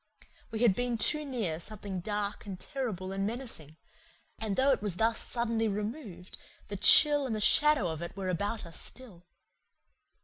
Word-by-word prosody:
We 225 Hz, 0 st, -4 dB
had 225 Hz, -5 st, +6 dB
been 245 Hz, +2 st, -1 dB
too 300 Hz, +7 st, +2 dB
near 220 Hz, -, -2 dB
something 200 Hz, 0 st, -6 dB
dark 205 Hz, +2 st, -4 dB
and 190 Hz, -2 st, -6 dB
terrible 215 Hz, -10 st, -4 dB
and 195 Hz, 0 st, -2 dB
menacing; 220 Hz, -, -6 dB, 0.6 s
and 215 Hz, -3 st, -2 dB
though 270 Hz, +4 st, +4 dB
it 260 Hz, -, +1 dB
was 205 Hz, -4 st, -2 dB
thus 225 Hz, +3 st, +1 dB
suddenly 230 Hz, -2 st, 0 dB
removed 210 Hz, -, -5 dB, 0.3 s
the 205 Hz, -, -4 dB
chill 290 Hz, +7 st, +6 dB
and 215 Hz, -3 st, -2 dB
shadow 300 Hz, -8 st, +4 dB
of 160 Hz, -1 st, -4 dB
it 170 Hz, +3 st, -7 dB
were 190 Hz, -1 st, -3 dB
about 205 Hz, +4 st, -2 dB
us 170 Hz, -, -7 dB
still. 205 Hz, -10 st, -10 dB
210 Hz, 165 wpm, -30 LUFS, 185-245 Hz, 0.6 s, had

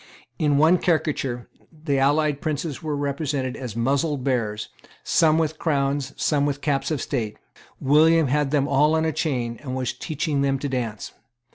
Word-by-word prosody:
In 150 Hz, -3 st, +2 dB
one 160 Hz, +4 st, +5 dB
caricature 140 Hz, -7 st, -1 dB, 0.2 s
the 150 Hz, -4 st, -2 dB
allied 145 Hz, +1 st, +2 dB
princes 155 Hz, -1 st, -3 dB
were 155 Hz, -2 st, -2 dB
represented 140 Hz, -2 st, -2 dB
as 125 Hz, -5 st, -6 dB
muzzled 135 Hz, +4 st, 0 dB
bears, 115 Hz, -5 st, -1 dB, 0.3 s
some 160 Hz, -1 st, +3 dB
with 160 Hz, -1 st, -1 dB
crowns, 140 Hz, -3 st, 0 dB
some 145 Hz, -2 st, +1 dB
with 145 Hz, -1 st, -2 dB
caps 140 Hz, -2 st, -1 dB
of 155 Hz, -3 st, -1 dB
state. 115 Hz, -7 st, -3 dB, 0.4 s
William 160 Hz, +3 st, +4 dB
had 145 Hz, +1 st, +1 dB
them 140 Hz, -1 st, +1 dB
all 150 Hz, +3 st, +3 dB
in 160 Hz, 0 st, +1 dB
a 160 Hz, -, 0 dB
chain, 125 Hz, -7 st, -2 dB
and 130 Hz, -3 st, -5 dB
was 130 Hz, -1 st, -2 dB
teaching 150 Hz, -2 st, -2 dB
them 135 Hz, -1 st, +1 dB
to 145 Hz, -, -3 dB
dance. 120 Hz, -6 st, -4 dB
145 Hz, 165 wpm, -23 LUFS, 135-155 Hz, 0.4 s, one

